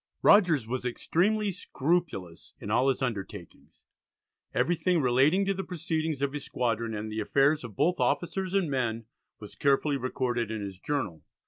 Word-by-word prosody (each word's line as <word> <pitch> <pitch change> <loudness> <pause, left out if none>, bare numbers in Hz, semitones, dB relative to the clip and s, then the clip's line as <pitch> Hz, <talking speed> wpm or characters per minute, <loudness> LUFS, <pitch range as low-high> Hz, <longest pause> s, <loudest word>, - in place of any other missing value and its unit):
Rogers 170 - +5
was 125 +3 -3
extremely 200 - 0
scrupulous 150 - -2
in 105 - -6
all 125 +4 +3
his 135 0 0
undertakings; 100 -6 -6 0.7
everything 175 +1 +1
relating 140 +9 +3
to 195 - +1
the 190 0 -4
proceedings 160 -4 -2
of 140 0 0
his 145 -2 -4
squadron 115 -2 -2
and 105 +1 -5
the 110 - -3
affairs 140 +7 +2
of 115 -5 -9
both 175 +5 +1
officers 185 +2 0
and 195 -4 +2
men 115 -4 -1 0.3
was 105 - -10
carefully 140 +1 +2
recorded 125 -3 -2
in 110 -1 -3
his 100 -2 -7
journal. 105 - -3
135 Hz, 155 wpm, -28 LUFS, 115-170 Hz, 0.7 s, Rogers